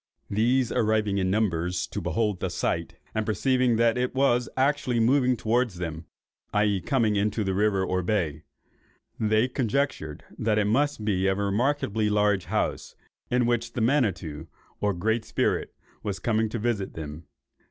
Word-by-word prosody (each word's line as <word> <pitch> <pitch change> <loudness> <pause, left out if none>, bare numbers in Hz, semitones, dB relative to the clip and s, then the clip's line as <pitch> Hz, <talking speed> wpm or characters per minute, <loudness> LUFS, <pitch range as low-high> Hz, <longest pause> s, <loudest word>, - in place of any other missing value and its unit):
These 120 +4 +2
arriving 110 -3 +1
in 95 -1 +1
numbers 90 -4 0
to - - -5
behold 105 -4 0
the 95 - -2
sight, 85 -1 -2 0.2
and 110 - 0
perceiving 125 +3 +2
that 115 +1 +3
it 125 +1 -1
was 125 -2 +2
actually 130 -3 +1
moving 125 +1 +3
towards 115 -2 0
them 80 -2 -5 0.5
(i.e. 105 -2 +2
coming 115 -5 +1
into 105 +2 0
the 95 -1 -1
river 100 -1 +2
or 90 0 0
bay), 85 -6 -1 0.8
they 110 +2 +3
conjectured 125 - -2 0.2
that 110 -1 +1
it 105 - +2
must 120 +1 +1
be 95 -2 +1
a 95 - +2
remarkably 105 +1 0
large 105 -2 +2
house, - - -2 0.3
in 125 0 +2
which 120 0 0
the 120 - -2
Manitto 95 - 0 0.3
(or 105 -2 0
Great 110 +5 0
Spirit), - - -1 0.3
was 100 -2 -3
coming 110 +2 0
to 115 - -3
visit 110 -3 -2
them. 80 0 -7
110 Hz, 155 wpm, -26 LUFS, 95-120 Hz, 0.8 s, that